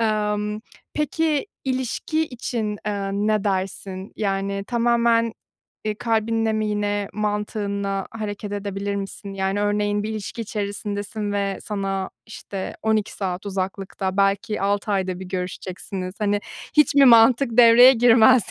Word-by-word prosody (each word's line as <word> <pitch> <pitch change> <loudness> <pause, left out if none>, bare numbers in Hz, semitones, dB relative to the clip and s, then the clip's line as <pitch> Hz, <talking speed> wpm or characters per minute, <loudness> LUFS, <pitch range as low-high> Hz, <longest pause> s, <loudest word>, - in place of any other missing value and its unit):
Emm, 210 -1 0 0.3
peki, 305 +2 0 0.2
ilişki 260 +5 -1
için, 230 -5 -3
eee, 200 -1 -2
ne 210 +1 +1
dersin? 190 0 -3
Yani, 195 -1 -1
tamamen, 235 -1 +2 0.5
eee, 215 -1 -1
kalbinle 225 0 0
mi 215 0 0
yine 205 -1 -1
mantığınla 205 -2 -2
hareket 205 -2 -5
edebilir 200 0 -3
misin? 195 0 -6
Yani, 195 +1 -1
örneğin 205 0 +1
bir 215 - -3
ilişki 215 +2 -5
içerisindesin 205 0 -4
ve 200 -1 -1
sana, 195 -2 -3 0.2
işte, 200 -3 -6
12 220 -1 +1
saat 190 0 -4
uzaklıkta, 190 0 -3
belki 200 +2 +1
6 205 +1 0
ayda 190 -2 -1
bir 190 - -7
görüşeceksiniz. 185 0 -5
Hani, 205 0 +1 0.4
hiç 300 -1 +5
mi 280 -1 +7
mantık 235 +1 +6
devreye 245 +2 +9
girmez? 240 -1 +5
205 Hz, 125 wpm, -23 LUFS, 195-225 Hz, 0.5 s, devreye